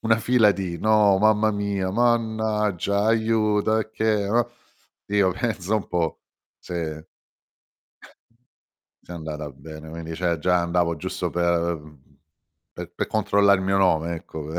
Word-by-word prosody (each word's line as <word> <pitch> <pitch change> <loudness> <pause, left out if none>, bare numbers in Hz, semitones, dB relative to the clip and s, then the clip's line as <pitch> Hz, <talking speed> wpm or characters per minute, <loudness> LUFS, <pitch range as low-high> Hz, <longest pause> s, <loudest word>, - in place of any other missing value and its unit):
una 110 0 +3
fila 115 -2 +4
di: 95 -4 -3
"No 105 -3 +4
mamma 110 +1 +3
mia, 100 -2 -2
mannaggia, 110 -4 0
aiuto, 110 -1 +2
e 110 - -4
che, 110 0 0 0.2
uhm" 120 +2 +2 0.6
io: 100 -2 +2
"Pensa 105 -1 -2
un 105 - -4
po' 85 -3 -2 0.4
se 80 -3 -5 2.0
se 90 - -11
è - - -6
andata 75 -2 -6
bene." 80 +3 -11
Quindi 80 0 -7
cioè, 85 0 0
già 90 +3 +2
andavo 85 -1 0
giusto - - -3
per 85 -1 0 0.9
per - - -8
per - - -3
controllare 100 -1 +3
il - - -4
mio 95 0 +2
nome, 85 -3 +2
ecco 80 -2 -8
95 Hz, 135 wpm, -24 LUFS, 85-110 Hz, 2.0 s, fila